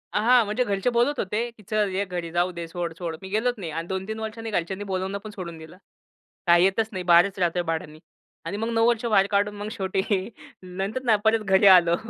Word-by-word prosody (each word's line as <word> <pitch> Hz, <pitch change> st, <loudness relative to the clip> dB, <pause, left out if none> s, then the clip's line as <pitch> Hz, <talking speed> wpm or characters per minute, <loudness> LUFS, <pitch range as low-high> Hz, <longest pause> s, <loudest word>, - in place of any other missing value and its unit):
अ -, -, +3 dB
हां, 245 Hz, 0 st, +6 dB
म्हणजे 215 Hz, +5 st, 0 dB
घरचे 200 Hz, 0 st, 0 dB
बोलत 245 Hz, +4 st, +1 dB
होते, 215 Hz, +5 st, -1 dB
की 225 Hz, -2 st, -19 dB
"चल, 210 Hz, -1 st, +2 dB
ये 200 Hz, -, +1 dB
घरी, 175 Hz, -3 st, -5 dB
जाऊ 175 Hz, +1 st, +2 dB
दे. 170 Hz, -1 st, -6 dB
सोड, 170 Hz, 0 st, -4 dB
सोड." 170 Hz, -2 st, -4 dB
मी 190 Hz, -, -8 dB
गेलोच 230 Hz, +5 st, 0 dB
नाही 175 Hz, -6 st, -6 dB
आणि 165 Hz, +2 st, -4 dB
2-3 190 Hz, +4 st, -4 dB
वर्षांनी 225 Hz, +1 st, -5 dB
घरच्यांनी 190 Hz, +1 st, -2 dB
बोलावणं 190 Hz, +1 st, -2 dB
पण 215 Hz, -, -7 dB
सोडून 170 Hz, -3 st, -7 dB
दिलं. 160 Hz, +2 st, -12 dB, 0.7 s
काय 170 Hz, 0 st, +6 dB
येतच 195 Hz, +4 st, +2 dB
नाही 185 Hz, -3 st, -4 dB
बाहेरच 175 Hz, +3 st, +5 dB
राहतोय 175 Hz, 0 st, +1 dB
भाड्यानी 160 Hz, -2 st, -4 dB, 0.5 s
आणि 190 Hz, +5 st, -4 dB
मग 225 Hz, +2 st, -2 dB
9 225 Hz, 0 st, +3 dB
वर्ष 235 Hz, 0 st, +1 dB
बाहेर 205 Hz, -4 st, +3 dB
काढून 205 Hz, +1 st, +1 dB
मग 205 Hz, +1 st, -6 dB
शेवटी 190 Hz, -2 st, -2 dB, 0.6 s
नंतर 195 Hz, +7 st, -4 dB
नाही 220 Hz, -4 st, +3 dB
परत 220 Hz, +1 st, +4 dB
घरी 195 Hz, +1 st, +4 dB
आलो 170 Hz, -1 st, +4 dB
195 Hz, 220 wpm, -25 LUFS, 175-220 Hz, 0.7 s, हां